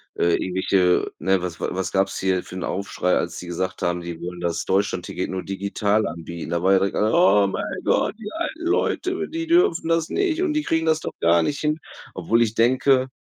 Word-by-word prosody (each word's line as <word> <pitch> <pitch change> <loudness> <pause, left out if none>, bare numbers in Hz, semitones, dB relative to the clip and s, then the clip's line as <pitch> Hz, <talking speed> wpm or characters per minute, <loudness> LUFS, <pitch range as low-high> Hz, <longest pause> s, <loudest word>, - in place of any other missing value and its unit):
äh, 85 0 +2
irgendwelche, 90 0 +1
ne, 95 +2 +1
was 90 -2 -5
wa - - -2
was 95 0 -3
gab's 95 0 0
hier 95 -1 0
für - - -13
'n 90 - -4
Aufschrei, 95 -1 -1
als - - -2
sie 90 - -9
gesagt 90 +2 -3
haben, 85 0 0
die 85 -1 -7
wollen 90 0 -6
das 85 0 -2
Deutschlandticket 95 -2 -1
nur 95 -1 -3
digital 100 +2 0
anbieten? 85 0 -7
Da 85 0 0
war 95 +1 +4
ja - - +6
direkt 100 +1 -1
alle: 110 +1 +2
„Oh 135 - +5
mein 95 - -3 0.2
Gott, - - +1
die 210 -2 -7
alten 335 0 -4
Leute, 370 +2 0
die 330 +1 -4
dürfen 335 - +3
das 165 -1 +1
nicht 360 -4 0
und 325 -4 0
die 305 - +1
kriegen 160 - 0
das 160 0 +2
doch - - -5
gar 85 +1 +4
nicht 140 - -2
hin“, 155 +1 0 0.4
obwohl 95 +6 +1
ich 110 - -2
denke 130 +2 +3
100 Hz, 220 wpm, -23 LUFS, -, 0.4 s, ja